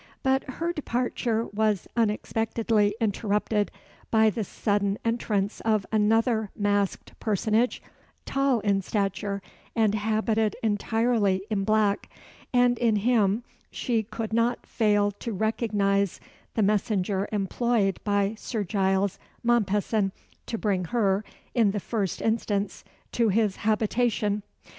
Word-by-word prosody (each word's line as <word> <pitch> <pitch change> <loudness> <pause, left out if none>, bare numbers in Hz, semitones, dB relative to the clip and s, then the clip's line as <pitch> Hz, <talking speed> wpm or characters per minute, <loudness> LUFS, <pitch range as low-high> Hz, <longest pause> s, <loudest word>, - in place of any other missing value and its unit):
But 265 0 +2
her 335 +6 -2
departure 240 -5 -1
was 210 -3 +1
unexpectedly 225 -1 +1
interrupted 210 -1 0 0.4
by 220 -1 +4
the 220 +1 -2
sudden 200 0 0
entrance 215 -3 0
of 215 -3 +1
another 220 0 +2
masked 205 -1 0
personage, 220 +3 +1 0.4
tall 275 -4 +1
in 200 -2 +2
stature, 200 0 -2 0.3
and 220 -3 +3
habited 215 0 +1
entirely 215 -2 +1
in 195 -2 0
black; 215 -1 +2 0.4
and 245 -1 +3
in 230 -3 +3
him 215 0 +2 0.3
she 235 -3 0
could 220 +1 -5
not 230 +1 +1
fail 205 -2 +2
to 235 - -4
recognise 200 -2 0 0.4
the 220 - +2
messenger 200 -1 +1
employed 205 0 +1
by 200 0 +1
Sir 220 -4 -3
Giles 195 0 0 0.2
Mompesson 210 -3 +1 0.3
to 230 - -2
bring 195 -5 0
her, 200 0 +1 0.3
in 230 -5 +4
the 205 +1 -1
first 200 -2 -2
instance, 210 -3 -1 0.3
to 230 -2 +2
his 205 -1 +1
habitation. 215 -1 +1
215 Hz, 115 wpm, -26 LUFS, 200-230 Hz, 0.4 s, by